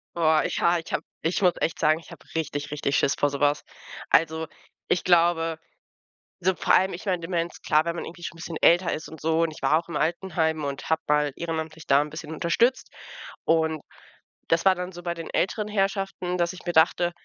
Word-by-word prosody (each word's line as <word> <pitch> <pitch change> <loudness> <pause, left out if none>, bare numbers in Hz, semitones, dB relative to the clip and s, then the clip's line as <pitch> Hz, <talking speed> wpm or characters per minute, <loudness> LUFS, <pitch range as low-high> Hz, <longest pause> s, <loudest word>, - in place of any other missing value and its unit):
Boah, 160 -2 +3
ich - - -2
ha 175 +1 +3
ich 165 - -10
habe - - -1 0.2
ich 165 +5 0
muss 180 -2 +4
echt 165 - -1
sagen, 155 0 +3
ich 165 - -16
habe - - -13
richtig, 145 -2 -3
richtig 145 -1 0
Schiss 140 - +2
vor 145 - +2
so 140 0 -5
was. 145 0 +2 0.5
Also, 160 0 +2 0.4
ich 180 - +1
glaube, 165 -2 +3 0.8
so 190 +1 +2
vor - - +1
allem, 190 +1 +3
ich 175 - -8
meine 180 -3 0
Demenz, 170 0 -3
klar, 155 +2 +2
wenn 170 - -2
man - - -4
irgendwie 175 - -10
schon 170 - -5
'n - - -14
bisschen 165 -1 -5
älter 175 +1 +4
ist 155 - -5
und 160 - -11
so 160 +2 +1
und 165 - 0
ich 155 - -12
war 150 +4 +4
auch 170 - -11
im 170 - -5
Altenheim 160 -3 0
und 140 -1 -5
habe 160 0 +2
mal 150 -1 +2
ehrenamtlich 160 -1 -5
da 140 +1 +5
'n 150 - -4
bisschen 155 0 -7
unterstützt. 235 - +1 0.6
Und 160 -1 +2 0.7
das 165 +2 +2
war 190 -1 +6
dann 180 0 -5
so 175 -1 -10
bei 170 -1 -2
den 165 -1 -7
älteren 210 +3 0
Herrschaften, 195 -3 -1
dass 170 0 0
ich 185 - -12
mir 175 - -2
dachte 175 +2 +4
165 Hz, 225 wpm, -25 LUFS, 155-175 Hz, 0.8 s, war